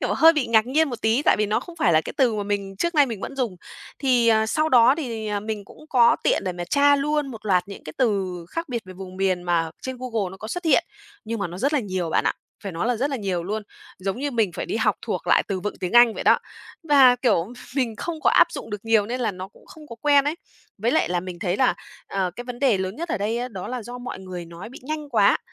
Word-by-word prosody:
kiểu, - - 0
hơi 325 +1 +7
bị 300 -6 0
ngạc 230 0 +4
nhiên 305 +3 +2
một 240 -2 -7
tí, 225 +6 +2
tại - - +4
vì 210 - +2
nó 210 - 0
không 345 -1 -11
phải 175 - +2
là 155 - +5
cái - - -6
từ 255 -6 +3
mà 205 - -1
mình 200 -1 -3
trước 340 - -1
nay 290 -3 +5
mình 225 -5 -5
vẫn 275 - -6
dùng. 235 -9 -2 0.4
Thì, 250 -4 +3
ờ, 220 -1 +4
sau 310 +7 +1
đó, 245 0 +6
thì, 230 -7 -4
à, 205 -1 -1
mình 210 -1 -5
cũng 305 +9 -16
có 235 -2 +5
tiện - - +2
để 185 - -1
mà 175 0 -5
tra 285 +9 +4
luôn 295 0 0
một 225 -4 -9
loạt 185 -1 +2
những 200 - -10
cái 155 - -7
từ 210 -7 +1 0.3
khác 330 -2 -4
biệt 235 -3 -3
về 185 - -10
vùng 185 0 -9
miền 185 -2 0
mà 170 -2 0
trên 260 0 -5
Google 225 -7 -2
nó 190 - -10
có 215 +3 -8
xuất 355 +5 -4
hiện. 325 +1 +4 0.4
Nhưng 230 +1 -3
mà 200 - -1
nó 175 - -8
rất 280 +8 +1
là 295 - +2
nhiều 185 -5 -3
bạn - - +1
ạ, - - +2 0.3
phải 195 - -4
nói 170 +7 -2
là 245 - +1
rất 275 +6 -1
là 270 - -1
nhiều 190 -5 -2
luôn. 215 +3 -3 0.4
Giống 195 +4 -3
như 285 +1 -2
mình 225 -7 +1
phải - - -5
đi 370 - -2
học - - +1
thuộc - - -4
lại - - +4
từ 190 -2 -2
vựng 210 - -4
tiếng 180 -1 -3
Anh 240 -2 +7
vậy - - -5
đó. - - +5 0.4
Và, 275 -6 +6
kiểu, 225 -5 +1 0.2
mình 240 -5 0
không 320 +8 -5
có - - +3
áp - - +6
dụng - - -7
được 210 0 -6
nhiều 225 -2 +3
nên 250 +2 -3
là 225 -4 0
nó 185 +1 -8
cũng - - -22
không 310 -1 -14
có 235 - -10
quen 285 -1 +5
ấy. 295 - 0 0.4
Với 225 +4 +1
lại 315 - +2
là 175 0 0
mình 180 -1 -8
thấy 185 0 -1
là, 260 - +3 0.3
ờ, 190 -2 -1
cái 245 - -6
vấn 245 -1 -7
đề 250 -8 +3
lớn 190 +1 -3
nhất 340 +3 -5
ở 235 - -1
đây 215 +3 -1
á, 245 +1 -3
đó 190 -5 -7
là 250 -1 -4
do 245 +3 -8
mọi 245 -5 -6
người 185 -2 -7
nó 170 +5 -10
bị 255 - -12
nhanh 300 +2 -5
quá. 210 -6 +4
225 Hz, 290 wpm, -23 LUFS, 195-265 Hz, 0.4 s, hơi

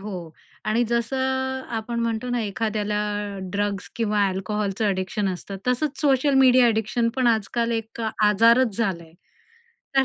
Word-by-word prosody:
हो 185 -5 -7 0.4
आणि 225 +3 +2
जसं 235 +2 -1
अ, 265 0 -1
आपण 235 +1 -3
म्हणतो 230 +1 -2
ना 245 -1 0
एखाद्याला 210 0 -2 0.6
ड्रग्स 200 -1 -2
किंवा 210 -3 +1
अल्कोहलचं 200 +2 -2
अ‍ॅडिक्शन 195 +1 -1
असतं, 195 +2 -7
तसंच 265 +2 0
सोशल 280 -1 +3
मीडिया 255 -1 +6
अ‍ॅडिक्शन 225 +1 +1
पण 260 -2 +2
आजकाल 230 +1 +1
एक 225 0 -4 0.2
आजारच 230 +2 +4
झालाय, 170 -8 -2 0.8
तर 270 - +5
225 Hz, 135 wpm, -24 LUFS, 205-245 Hz, 0.8 s, मीडिया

